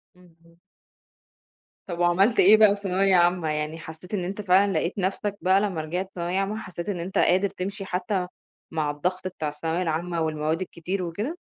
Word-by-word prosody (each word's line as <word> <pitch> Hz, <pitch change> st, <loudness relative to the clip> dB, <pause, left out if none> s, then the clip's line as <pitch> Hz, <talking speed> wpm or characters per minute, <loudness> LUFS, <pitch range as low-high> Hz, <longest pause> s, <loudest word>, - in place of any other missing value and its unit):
اهم. 170 Hz, -2 st, -23 dB, 1.3 s
طَب 175 Hz, -3 st, -6 dB
وعملت 180 Hz, +6 st, +3 dB
إيه 205 Hz, +4 st, +8 dB
بقى 215 Hz, -1 st, +7 dB
في 200 Hz, -, -8 dB
ثانوية 195 Hz, 0 st, +2 dB
عامة، 175 Hz, -2 st, +3 dB
يعني 150 Hz, +1 st, -2 dB
حسّيت 160 Hz, +5 st, -11 dB
إن 190 Hz, -4 st, 0 dB
أنت 195 Hz, +4 st, -4 dB
فعلًا 195 Hz, +1 st, +4 dB
لقيت 175 Hz, -, 0 dB
نَفْسك 200 Hz, +1 st, -2 dB
بقى 190 Hz, +2 st, +4 dB
لمّا 190 Hz, -6 st, -1 dB
رِجِعت 180 Hz, +5 st, -4 dB
ثانوية 175 Hz, +2 st, -1 dB
عامة، 195 Hz, +2 st, -1 dB
حسّيت 180 Hz, -3 st, -6 dB
إن 190 Hz, -4 st, -2 dB
أنت 180 Hz, +3 st, -4 dB
قادر 190 Hz, +3 st, +3 dB
تمْشِي 195 Hz, +1 st, -5 dB
حتى 185 Hz, 0 st, -2 dB, 0.4 s
مع 155 Hz, -3 st, 0 dB
الضغط 180 Hz, +6 st, -2 dB
بتاع 165 Hz, -4 st, -4 dB
الثانوية 160 Hz, +4 st, -2 dB
العامة 170 Hz, 0 st, -1 dB
والمواد 155 Hz, +1 st, -1 dB
الكتير 185 Hz, +1 st, -4 dB
وكده؟ 210 Hz, -, -4 dB
180 Hz, 175 wpm, -25 LUFS, 165-195 Hz, 1.3 s, إيه